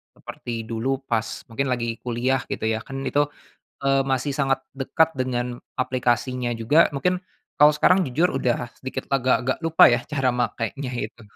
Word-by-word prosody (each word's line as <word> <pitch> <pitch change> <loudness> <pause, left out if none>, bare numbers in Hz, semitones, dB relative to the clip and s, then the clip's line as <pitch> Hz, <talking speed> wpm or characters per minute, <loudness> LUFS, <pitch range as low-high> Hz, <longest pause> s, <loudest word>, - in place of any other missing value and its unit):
seperti 120 - -8 0.2
dulu 115 +2 -3 0.2
pas 115 -2 +1 0.2
mungkin 135 +4 -1
lagi 120 -2 -1 0.2
kuliah 125 +2 0
gitu - - -3
ya. - - 0
Kan 135 - -6
itu, 145 - +3 0.6
eee, 135 0 +3
masih 135 +2 0
sangat 135 -1 +2 0.2
dekat 160 +4 +3
dengan 125 -1 0 0.4
aplikasinya 125 0 0
juga. 120 +8 +2 0.2
Mungkin 180 +6 +1 0.4
kalau 150 +1 +7
sekarang, 185 +4 +5
jujur 155 +7 +2
udah 125 -3 +1 0.2
sedikit 130 0 -5
agak-agak 130 -1 +2
lupa 165 0 +5
ya 120 - +2
cara 135 -3 +1
makenya 125 +3 -3 0.2
itu. 115 +2 -15
130 Hz, 155 wpm, -24 LUFS, 120-135 Hz, 0.6 s, kalau